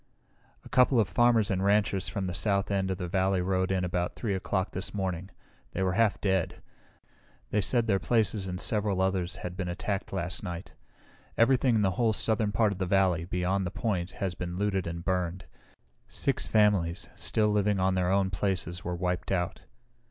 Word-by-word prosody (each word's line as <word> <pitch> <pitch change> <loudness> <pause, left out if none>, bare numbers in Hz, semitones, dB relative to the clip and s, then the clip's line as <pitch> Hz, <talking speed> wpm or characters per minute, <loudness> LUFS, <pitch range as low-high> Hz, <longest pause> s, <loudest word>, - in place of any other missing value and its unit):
"A - - -11
couple 125 -1 +4
of 105 - +3
farmers 120 -3 +3
and 95 0 0
ranchers 100 -2 +2
from 100 - -3
the 90 - -3
south 100 +2 0
end 95 -1 0
of 95 - -1
the 90 - -4
valley 95 +1 +1
rode 95 +1 0
in 95 -1 +1
about 90 0 -2
3 110 -4 -2
o'clock 95 0 -1
this 95 +1 -4
morning. 95 -2 -3 0.4
They 95 - -1
were 95 - +1
half 110 +1 +2
dead. 95 -3 -1 0.9
They 105 - +2
said 120 +4 +1
their 100 -4 +2
places 105 -4 +1
and 90 0 -4
several 105 -2 +1
others 95 -2 0
had 90 0 -6
been 95 -2 -3
attacked 95 +3 -3
last 90 -2 -3
night. 90 -2 -6 0.6
Everything 125 0 +4
in 110 - +3
the 95 - +2
whole 115 -2 +3
southern 110 0 +1
part 110 0 +2
of 100 - -5
the 95 - -1
valley, 90 -3 +2
beyond 90 +2 0
the - - -2
point, 95 -5 -2
has 95 -2 -3
been 90 0 -5
looted 95 -3 0
and 85 +1 -5
burned. 90 -1 -1 0.6
Six - - -1
families, 100 -4 +2
still 105 -1 +1
living 105 -1 +1
on 95 0 +2
their 90 -1 +1
own 95 0 +2
places 90 -2 -2
were 90 0 -3
wiped 90 +1 -2
out." 90 -2 -1
95 Hz, 190 wpm, -29 LUFS, 90-105 Hz, 0.9 s, couple